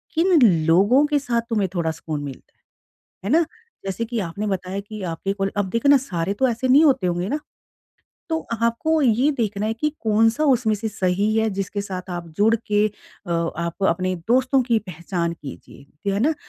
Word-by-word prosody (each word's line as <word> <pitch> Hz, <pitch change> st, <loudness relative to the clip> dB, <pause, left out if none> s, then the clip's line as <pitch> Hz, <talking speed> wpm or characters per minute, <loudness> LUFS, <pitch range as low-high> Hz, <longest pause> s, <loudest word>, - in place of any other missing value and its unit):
किन 340 Hz, +1 st, +4 dB, 0.3 s
लोगों 205 Hz, -, +5 dB
के 295 Hz, -1 st, +1 dB
साथ 240 Hz, -4 st, -1 dB
तुम्हें 210 Hz, -5 st, 0 dB
थोड़ा 165 Hz, -2 st, 0 dB
सुकून 155 Hz, -2 st, -5 dB
मिलता 140 Hz, -2 st, -9 dB, 0.5 s
है। 195 Hz, -, -10 dB
है -, -, 0 dB
ना? 340 Hz, -, +2 dB, 0.4 s
जैसे 195 Hz, +4 st, -2 dB
कि 235 Hz, 0 st, -3 dB
आपने 200 Hz, +3 st, -3 dB
बताया 190 Hz, -1 st, -3 dB
कि 210 Hz, +1 st, -8 dB
आपके 195 Hz, +4 st, -3 dB
कॉल 195 Hz, -1 st, -2 dB
अब 200 Hz, -2 st, 0 dB
देखो 230 Hz, +7 st, +1 dB
ना 285 Hz, -, +8 dB
सारे 190 Hz, -7 st, -3 dB
तो 260 Hz, +6 st, +1 dB
ऐसे 240 Hz, +2 st, -1 dB
नहीं 275 Hz, +5 st, +6 dB
होते 260 Hz, -11 st, +3 dB
होंगे 175 Hz, +1 st, -1 dB
ना? 295 Hz, -, -1 dB, 0.9 s
तो 320 Hz, -1 st, 0 dB, 0.2 s
आपको 270 Hz, +8 st, +1 dB
ये 250 Hz, +3 st, +3 dB
देखना 210 Hz, -3 st, -1 dB
है 220 Hz, -, -1 dB
कि 270 Hz, +7 st, 0 dB
कौन-सा 225 Hz, +5 st, +2 dB
उसमें 250 Hz, -6 st, +3 dB
से 220 Hz, +2 st, -3 dB
सही 200 Hz, 0 st, 0 dB
है, 220 Hz, 0 st, +2 dB
जिसके 195 Hz, +1 st, -3 dB
साथ 185 Hz, -2 st, -6 dB
आप 175 Hz, -1 st, -5 dB
जुड़ 220 Hz, +2 st, +4 dB
के 210 Hz, 0 st, +2 dB
अ, 205 Hz, -2 st, -12 dB
आप 170 Hz, +2 st, -2 dB
अपने 185 Hz, +2 st, 0 dB
दोस्तों 260 Hz, +2 st, +3 dB
की 235 Hz, -2 st, +2 dB
पहचान 170 Hz, -3 st, -4 dB
कीजिए। 150 Hz, +4 st, -8 dB
है 200 Hz, -, -1 dB
ना? 305 Hz, +7 st, +2 dB
210 Hz, 195 wpm, -22 LUFS, 185-240 Hz, 0.9 s, ना